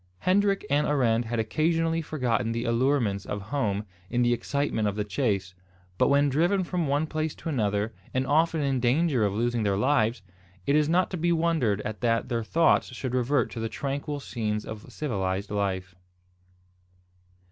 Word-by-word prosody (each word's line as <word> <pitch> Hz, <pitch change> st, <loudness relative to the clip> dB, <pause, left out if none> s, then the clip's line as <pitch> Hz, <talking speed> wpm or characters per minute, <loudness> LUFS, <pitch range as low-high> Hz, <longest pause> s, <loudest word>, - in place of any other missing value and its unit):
Hendrik 195 Hz, -, +2 dB
and 145 Hz, +1 st, +2 dB
Arend 120 Hz, -5 st, +2 dB
had 115 Hz, +1 st, -3 dB
occasionally 165 Hz, +8 st, +1 dB
forgotten 120 Hz, -8 st, -1 dB
the 115 Hz, +1 st, -2 dB
allurements 115 Hz, -4 st, +1 dB
of 105 Hz, -, -4 dB
home 105 Hz, -2 st, -2 dB, 0.2 s
in 120 Hz, 0 st, +1 dB
the 120 Hz, 0 st, +3 dB
excitement 120 Hz, -2 st, -1 dB
of 100 Hz, -, -1 dB
the 105 Hz, -, -1 dB
chase; 100 Hz, -5 st, -1 dB, 0.5 s
but -, -, +4 dB
when 140 Hz, +1 st, +4 dB
driven 175 Hz, +8 st, +2 dB
from 175 Hz, -3 st, -1 dB
one 145 Hz, +3 st, +1 dB
place 155 Hz, 0 st, -3 dB
to -, -, -6 dB
another, 105 Hz, -5 st, 0 dB, 0.2 s
and 130 Hz, +1 st, 0 dB
often 160 Hz, +3 st, +2 dB
in 135 Hz, -2 st, +1 dB
danger 130 Hz, +1 st, +2 dB
of 100 Hz, -2 st, +1 dB
losing 120 Hz, +1 st, 0 dB
their 100 Hz, -2 st, +1 dB
lives, 115 Hz, -3 st, +1 dB, 0.4 s
it 140 Hz, -, +2 dB
is 150 Hz, 0 st, +3 dB
not 180 Hz, +2 st, +2 dB
to 185 Hz, -, -2 dB
be 175 Hz, +1 st, +1 dB
wondered 160 Hz, -, +1 dB
at 110 Hz, 0 st, -5 dB
that 115 Hz, -1 st, +1 dB
their 115 Hz, -1 st, -1 dB
thoughts 165 Hz, +8 st, +3 dB
should 130 Hz, 0 st, -4 dB
revert 130 Hz, +3 st, +1 dB
to 115 Hz, -, -6 dB
the 115 Hz, 0 st, -2 dB
tranquil 145 Hz, +3 st, -3 dB
scenes 110 Hz, -5 st, -3 dB
of 110 Hz, -1 st, -8 dB
civilised 100 Hz, -8 st, -2 dB
life. 95 Hz, -3 st, -2 dB
125 Hz, 175 wpm, -27 LUFS, 110-150 Hz, 0.5 s, but